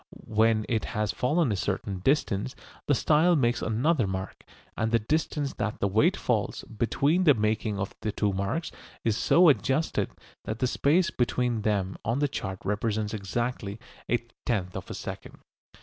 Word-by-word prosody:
When 110 0 +2
it 110 -4 0
has 105 -1 +1
fallen 145 +1 +1
a - - +1
certain 95 0 -2
distance 115 0 0 0.3
the 145 - +4
style 160 +6 +4
makes 120 -5 +1
another 120 +2 +1
mark. 95 0 -5 0.3
And 110 0 -1
the 115 - +5
distance 145 +4 -1
that 110 -1 -3
the 100 - +1
weight 105 +3 +3
falls - - -1
between 140 - +1
the 145 -4 +7
making 110 -1 0
of 95 0 -3
the 110 - -1
two 100 -1 0
marks 100 - -2 0.3
is 110 -2 +1
so 175 +9 +5
adjusted 135 +4 +2 0.4
that 110 - -3
the 130 - +1
space 155 +8 +2
between 120 -2 0
them 100 -3 0
on 115 +3 0
the 145 +1 +2
chart 95 -8 -5
represents 105 +1 -1
exactly 110 0 -3 0.3
a 120 -1 +1 0.2
tenth 95 -6 -1
of - - -6
a - - -5
second. - - -7
110 Hz, 165 wpm, -27 LUFS, 105-135 Hz, 0.4 s, the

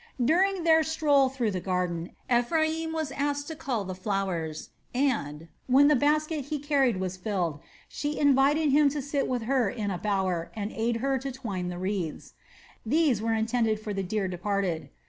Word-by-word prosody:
During 370 +5 +2
their 320 -1 +5
stroll 295 -4 +3
through 250 -5 -1
the 185 - -2
garden 180 -2 -2
Ephraim 315 +6 +1
was 315 -3 -2
asked 285 0 -2
to - - -4
help 310 - -14
her - - -14
cull 235 -6 0
the 185 -1 -5
flowers 185 -5 -3 0.2
and, 170 - -1 0.2
when 275 +3 +6
the 300 - +5
basket 300 +1 +1
he 300 +1 -3
carried 275 -6 +1
was 185 0 -3
filled, 180 -6 -2 0.3
she 295 0 -3
invited 285 +2 +4
him 290 +1 +5
to 290 +1 -3
sit 280 0 -1
with 250 -2 -1
her 250 -3 +1
in 205 -1 -3
a 180 - -3
bower 190 -5 -1
and 210 0 -3
aid 230 +1 -1
her 270 -1 +1
to 270 +1 -4
twine 210 -9 -4
the 175 - -5
wreaths. 185 -3 -4 0.5
These 275 -2 +2
were 225 0 0
intended 225 -1 +1
for 215 -1 -5
the 195 - -2
dear 195 +1 -1
departed. 185 -2 -2
240 Hz, 185 wpm, -27 LUFS, 190-285 Hz, 0.5 s, when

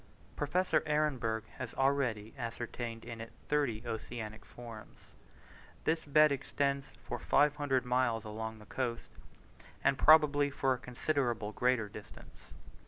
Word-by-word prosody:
Professor 175 +6 +1
Ehrenberg 130 -8 +1 0.2
has 125 -2 -5
already 130 -6 +1
ascertained 115 0 -5
in 115 -1 -7
it 115 - -8 0.2
thirty 140 -7 0
oceanic 110 -1 -5
forms. 115 -3 -11 0.9
This 160 0 0
bed 150 +1 +6
extends 140 0 -1 0.2
for - - -4
500 145 -3 +2
miles 125 -3 +1
along 110 +1 -5
the 105 - -14
coast, 120 +2 -3 0.7
and 135 - +3
probably 145 -2 +6
for 135 -1 +1
a 125 - -5
considerably 125 -4 -1
greater 125 -3 +2
distance. 105 0 -13
125 Hz, 120 wpm, -33 LUFS, 115-140 Hz, 0.9 s, bed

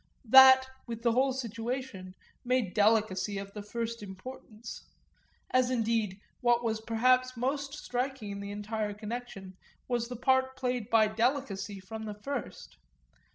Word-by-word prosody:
That, 260 +2 +9 0.2
with 230 -1 -6
the 235 - +4
whole 260 +3 +3
situation, 230 -5 -5 0.3
made 250 -6 0
delicacy 210 -2 +2
of 200 0 -7
the 210 - -6
first 230 +2 -4
importance; 215 +3 -9 0.7
as 255 -1 +3
indeed 225 -5 0 0.2
what 240 -1 +2
was 220 -1 -1
perhaps 255 +3 +2
most 275 +3 -2
striking 250 -5 -3
in 200 - -5
the 200 0 -6
entire 210 0 -3
connection 210 -4 -7 0.3
was 240 -2 -1
the 250 - -6
part 260 +2 +2
played 250 -4 -2
by 225 -1 +5
delicacy 215 -3 -1
from 220 +4 -7
the 210 -1 -5
first. 250 - -6
230 Hz, 140 wpm, -30 LUFS, 210-255 Hz, 0.7 s, That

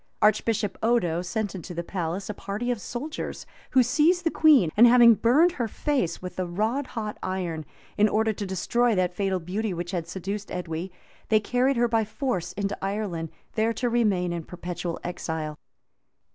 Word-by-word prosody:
Archbishop 215 -1 +1
Odo 180 -8 +2
sent 205 +3 -3
into 180 -1 -7
the 170 - -2
palace 180 +1 -3
a 210 - -3
party 205 +5 -3
of 235 -4 -3
soldiers, 275 - -5 0.2
who 260 - +5
seized 325 +8 +3
the 330 - +1
queen; 280 - +5
and 235 +3 +8
having 240 -1 +8
burned 275 - +4
her 245 -9 -2
face 235 - -1
with 180 0 -6
a 185 - 0
rod 220 +10 -1
hot 215 -2 -5
iron, 180 -4 -3 0.4
in 210 +1 +5
order 220 +1 +1
to 200 -1 -5
destroy 230 +5 +1
that 180 -1 +1
fatal 190 0 0
beauty 190 +3 -3
which 175 +1 -4
had 170 -3 -3
seduced 195 +3 -5
Edwy, 175 0 -4 0.4
they 215 - +5
carried 250 +4 +1
her 240 0 +3
by 225 -1 +2
force 215 - -3
into 200 0 -2
Ireland, 195 -5 -2 0.2
there 225 +1 +1
to 245 +1 -1
remain 200 -7 +1
in 170 -1 -4
perpetual 175 -1 -5
exile. 160 -3 -4
205 Hz, 175 wpm, -26 LUFS, 180-235 Hz, 0.4 s, and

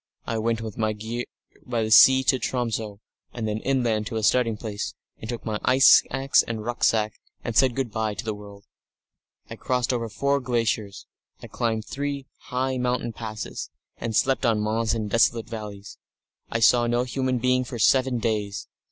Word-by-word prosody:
I 115 - -2
went 115 0 -1
with 110 -1 -7
my 110 -1 +1
gear 115 +3 -5 0.4
by 115 -3 -1
sea 130 +4 +8
to 130 0 +2
Tromso, 115 -5 -3 0.3
and 115 -2 -3
then 105 0 -2
inland 115 -5 0
to - - -5
a 110 - -2
starting 115 -1 +2
place, 105 -2 -5 0.2
and 110 - -8
took 120 -1 -5
my 110 -1 -2
ice 130 +1 +7
axe 135 +1 +3
and 110 -2 -5
rucksack, 110 -3 +1 0.3
and 115 - -4
said 130 0 +4
good 130 -4 -2
bye 110 -1 -2
to 105 - -6
the 110 - -1
world. 100 -1 -12 0.8
I - - -9
crossed 125 -1 0
over 115 -2 -2
four 140 +5 0
glaciers; 115 -5 -2 0.4
I - - -6
climbed 110 -2 -2
three 140 -1 -4 0.2
high 130 +1 -1
mountain 125 -2 -1
passes, 110 -1 -6 0.3
and 115 -1 -3
slept 135 +4 +2
on 115 -4 +2
moss 110 +2 0
in 110 -2 -3
desolate 115 +1 +2
valleys. 105 -3 -8 0.5
I 115 - -2
saw 120 +1 +5
no 120 +1 +1
human 130 0 -1
being 130 +1 +2
for 120 -1 -7
seven 130 +2 +3
days. 105 -3 -2
115 Hz, 180 wpm, -25 LUFS, 110-125 Hz, 0.8 s, sea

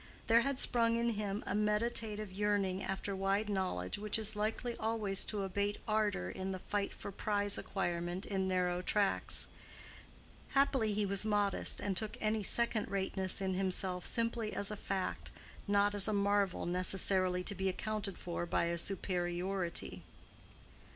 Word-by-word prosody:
There 230 0 +6
had 275 +1 0
sprung 230 -3 +3
up - - 0
in 235 - +2
him 205 -1 -2
a - - -2
meditative 210 0 0
yearning 195 -1 0
after 195 +1 -3
wide 195 +2 +1
knowledge 185 - -1
which 210 +1 +1
is 220 0 -1
likely 225 +3 -1
always 215 -3 0
to 205 -2 -2
abate 200 +2 -1
ardor 215 - +1
in 190 - -4
the - - -3
fight 200 +2 -2
for 200 - -7
prize 205 0 +1
acquirement 175 -1 -2
in 190 -2 -1
narrow 180 -1 +1
tracks. 200 +2 +1 1.1
Happily 265 -6 +3
he 210 0 +1
was 200 0 0
modest, 205 -2 +2
and 200 -2 -1
took 215 +3 -1
any 215 0 +1
second 230 +2 +2
rateness 190 -1 0
in 190 -1 0
himself 185 -1 0
simply 230 -2 0
as 200 +1 0
a - - -2
fact, 195 -2 -3 0.4
not 205 0 +3
as 205 -2 +2
a 215 - +1
marvel 200 -2 +2
necessarily 185 0 +2
to 200 - +1
be 190 0 0
accounted 210 0 -3
for 175 0 -4
by - - +1
a 170 0 0
superiority. 180 -1 -2
200 Hz, 155 wpm, -35 LUFS, 190-215 Hz, 1.1 s, There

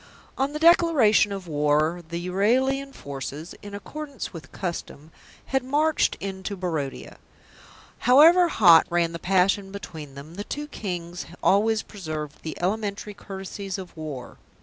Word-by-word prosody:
On 270 +2 0
the 300 - -4
declaration 310 - +5
of 195 -2 -5
war 150 +2 +1
the 170 - -3
Euralian 260 +9 +1
forces, 140 - -7
in 205 0 -8
accordance 285 +4 -7
with 165 -2 -10
custom, 165 -4 -6 0.3
had 265 -1 0
marched 300 +4 +1
into 195 +1 -5
Barodia. 160 -7 -4 0.9
However 330 +7 +8
hot 175 - +6
ran 170 -1 +1
the 170 - -6
passion 195 +2 +2
between 160 -8 -8
them, 145 +4 -10
the 205 - -3
two 295 +7 -5
Kings 180 - -5 0.2
always 215 +3 +3
preserved 155 -7 -6
the 160 - -6
elementary 205 +2 -2
courtesies 195 -1 -6
of 185 -2 -9
war. 150 -6 -7
195 Hz, 135 wpm, -25 LUFS, 165-230 Hz, 0.9 s, However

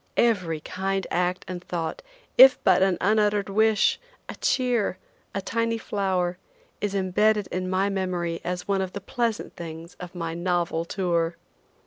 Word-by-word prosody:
Every 180 -9 +2
kind 195 +3 -2
act 180 +1 0
and 180 -1 -6
thought, 165 -3 -3 0.3
if 265 0 +9
but - - +5
an 190 -2 +3
unuttered 210 -1 +2
wish, 220 +1 +3 0.3
a - - -6
cheer, 245 -7 +1 0.4
a 195 - -1
tiny 230 +1 0
flower, 185 -4 -1 0.4
is 205 -1 -1
imbedded 205 +2 +2
in 185 0 -2
my 190 +1 +1
memory 180 -4 -2
as 180 +1 -4
one 195 -1 +1
of 185 -1 -4
the 200 - -4
pleasant 230 +2 -2
things 165 0 -8
of 180 0 -9
my 165 -2 -3
novel 170 -1 0
tour. 170 -2 0
185 Hz, 150 wpm, -25 LUFS, 175-205 Hz, 0.4 s, if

